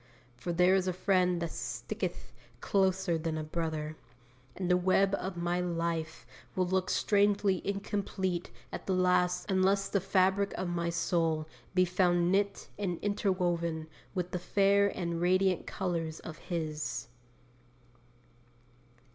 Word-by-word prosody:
For 150 +8 -4
'there 180 +2 +4
is 190 -1 +2
a 185 - +1
Friend 180 -1 +2
that 165 - -3
sticketh - - -4 0.3
closer 190 -3 +1
than 160 0 -2
a 155 - -2
brother,' 155 -1 -3 0.6
and 185 - -3
the 180 - +4
web 190 +2 +3
of 185 -1 -4
my 175 +1 0
life 165 -5 -2 0.3
will 185 - +2
look 185 0 0
strangely 205 -2 +2
incomplete 195 -3 -2 0.2
at - - -7
the 190 - +2
last 180 -1 +2
unless 195 +1 +2
the 200 - +1
fabric 195 +1 +2
of 185 - -2
my 170 -1 -1
soul 165 -2 0 0.3
be 185 0 +5
found 175 -1 +2
knit 200 +1 0
and 180 -4 -1
interwoven 175 -5 0 0.3
with 180 -1 -2
the 180 - -2
fair 200 +2 +3
and 170 -4 -3
radiant 185 0 +2
colours 165 -4 -2
of 160 - -8
His. 155 -9 -3
180 Hz, 135 wpm, -31 LUFS, 170-190 Hz, 0.6 s, be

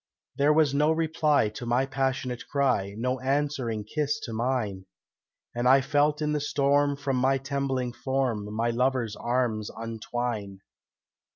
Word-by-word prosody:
There 145 +2 +3
was 150 -2 +3
no 150 +2 +3
reply 155 -6 +2
to 115 +3 -7
my 125 +3 +2
passionate 135 -2 -2
cry, 125 -9 +1
No 125 +3 -1
answering 135 -5 -1
kiss 150 +6 -1
to 115 - -6
mine, 110 -5 -2 0.7
And 120 +1 0
I 135 +1 +6
felt 145 +3 +1
in 150 - 0
the 150 -1 0
storm 145 0 +2
from 140 -2 -1
my 135 +2 +3
trembling 135 -2 -2
form 125 -6 -2
My 115 +2 0
lover's 120 -2 0
arms 120 -3 -1
untwine. 115 -3 -4
130 Hz, 145 wpm, -27 LUFS, 115-140 Hz, 0.7 s, I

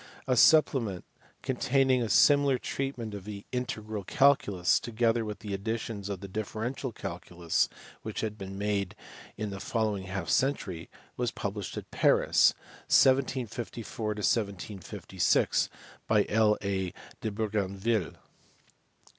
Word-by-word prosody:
A 130 - +2
supplement, 125 - +4 0.4
containing 130 0 +2
a 115 - -1
similar 140 0 +5
treatment 125 -4 -4
of 100 -2 -6
the 100 0 -8
integral 110 -5 -3
calculus, 120 - +3
together 115 0 +1
with 105 0 -7
additions 105 +1 -3
to 100 -1 -3
the 100 +2 -8
differential 110 +6 -4
calculus 90 -4 -2 0.3
which - - -4
had 110 -1 -2
been 95 -2 -7
made 100 -1 -1 0.4
in 105 -2 -3
the 100 - -6
following 105 -4 -1
half 95 -2 -4
century, 95 - 0 0.3
was 120 -1 0
published 100 -2 -5
at - - -7
Paris, - - +4 0.3
1754 120 -4 +1 1.0
6, - - +3 0.4
by 105 -2 +4
L. 105 0 +4
A. 95 -2 -1 0.3
de 110 - -1
Bougainville. 105 -1 -1
110 Hz, 115 wpm, -29 LUFS, 100-125 Hz, 1.0 s, similar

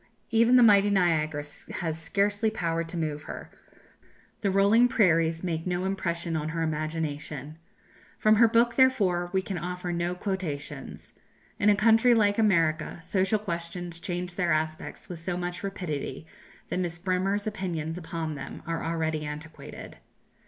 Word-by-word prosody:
Even 230 +2 +5
the 250 - +8
mighty 205 -2 +6
Niagara 160 -6 +1 0.3
has 160 -1 -3
scarcely 205 +5 +1
power 165 -6 -1
to 165 +1 -7
move 155 -2 -3
her; - - -8 0.9
the 200 - +1
rolling 200 +5 +5
prairies 165 -8 +2
make 165 -1 -2
no 180 +1 -1
impression 170 -3 -2
on 155 0 -2
her 165 0 -2
imagination. 155 -1 -3 0.6
From 215 0 +4
her 230 +1 +7
book, 235 +1 +3
therefore, 195 -10 +3
we 190 -1 +1
can 190 -2 -4
offer 180 +1 -4
no 175 +1 -1
quotations. 155 -8 -5 0.5
In 205 - +4
a 205 - +6
country 225 +3 +5
like 205 -1 +3
America 165 -7 +2
social 190 +3 +1
questions 170 -3 -4
change 180 0 -4
their 175 -2 0
aspects 155 0 -2
with 175 -2 -7
so 175 +1 -3
much 175 0 -4
rapidity 160 -7 -4 0.4
that - - -1
Miss 175 -1 -2
Bremer's 190 +3 0
opinions 175 -7 -3
upon 165 -2 -4
them 140 -1 -8
are 165 -1 -3
already 160 -2 -1
antiquated. 150 +1 -8
175 Hz, 150 wpm, -27 LUFS, 160-200 Hz, 0.9 s, the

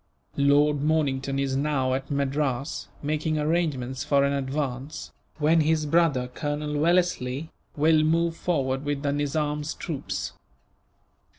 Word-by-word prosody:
Lord 145 +1 +4
Mornington 140 -3 0
is 135 -1 0
now 135 -2 +1
at 135 +1 -3
Madras, 140 -1 -1 0.2
making 155 +1 0
arrangements 150 -5 -1
for 140 -1 +3
an 140 0 +2
advance; 140 +1 -3 0.3
when 160 +2 +4
his 155 0 +2
brother, 150 -5 +2
Colonel 150 +2 -3
Wellesley, 160 -4 +1 0.2
will 155 +1 +4
move 165 +2 +2
forward 135 -6 -1
with 145 -1 -2
the 140 - +1
Nizam's 150 +1 -1
troops. 155 -6 -4
145 Hz, 120 wpm, -26 LUFS, 135-155 Hz, 0.3 s, Lord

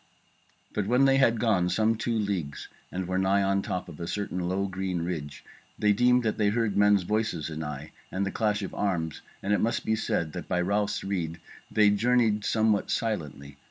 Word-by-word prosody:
But 100 -2 -1
when 125 +4 +4
they 135 0 +4
had 120 -4 +3
gone 100 -7 +2
some 110 +3 +2
two 115 +1 -1
leagues, 95 -9 -3 0.2
and 95 -1 -3
were 95 0 0
nigh 95 +1 +3
on 100 0 +1
top 90 -1 -4
of 75 - -11
a 85 - -4
certain 100 -2 -3
low 95 +2 -1
green 95 -2 -3
ridge, 80 -5 -5 0.3
they 105 -1 +3
deemed 125 +3 +4
that 110 -1 -1
they 105 -1 +3
heard 115 -1 0
men's 105 -1 +4
voices 105 -6 -1
anigh 75 -1 -5 0.2
and 95 +1 -1
the 100 - -2
clash 105 -2 0
of 95 - -5
arms; 85 -6 -2 0.2
and 100 - +1
it - - +2
must 115 - 0
be 110 - +2
said 85 -7 -1
that - - -6
by 90 - 0
Ralph's 100 +3 0
rede 85 -4 -3 0.3
they 105 -1 +4
journeyed 115 -1 +2
somewhat 110 -2 +2
silently. 75 -11 -3
100 Hz, 195 wpm, -27 LUFS, 90-110 Hz, 0.3 s, when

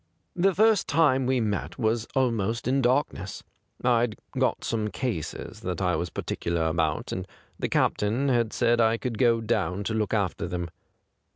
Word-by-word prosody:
' - - -48
The 195 -2 +4
first 220 0 +4
time 145 -5 +3
we 130 -1 +2
met 105 -4 -2
was 115 -1 0
almost 115 -4 0
in 135 +2 +2
darkness. 120 -7 0 0.4
I'd 120 -2 +2 0.2
got - - +1
some 110 -2 -1
cases 105 - -4
that 90 -2 -4
I 90 -3 +1
was 85 +2 -2
particular 85 +1 -2
about, 80 -1 0
and 95 0 -4 0.3
the - - -1
captain 115 +7 +1
had 120 -4 +2
said 120 -1 +2
I 115 0 +3
could 115 -3 -4
go 115 -2 +4
down 105 -4 -1
to 110 - -2
look 110 -1 0
after 100 -4 -1
them. 85 -1 -4
115 Hz, 170 wpm, -26 LUFS, 95-125 Hz, 0.4 s, The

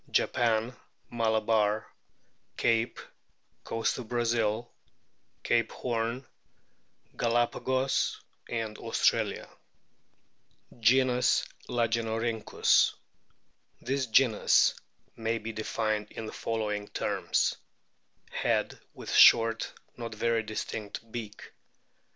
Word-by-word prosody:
Japan, 115 +1 +1 0.4
Malabar, 110 -2 +1 0.7
Cape, 115 0 +1 0.6
Coast 115 +3 -1
of 120 - -7
Brazil, 115 -1 0 0.7
Cape 115 -1 +1
Horn, 120 +2 -3 0.9
Galapagos, 120 +3 0 0.3
Australia. 110 -2 0 1.3
Genus 125 +2 +3 0.2
LAGENORHYNCHUS. 115 -1 +1 0.8
This 135 -1 -2
genus 115 -1 +4 0.4
may 115 0 -1
be 115 0 -5
defined 110 -1 -2
in 110 - -7
the - - -7
following 105 -2 -3
terms: - - 0 0.7
Head - - -1 0.2
with - - -7
short, 115 0 +6 0.3
not 115 -2 -6
very 115 +1 +1
distinct, 110 0 -6
beak. 110 -3 -7
115 Hz, 75 wpm, -29 LUFS, 110-120 Hz, 1.3 s, short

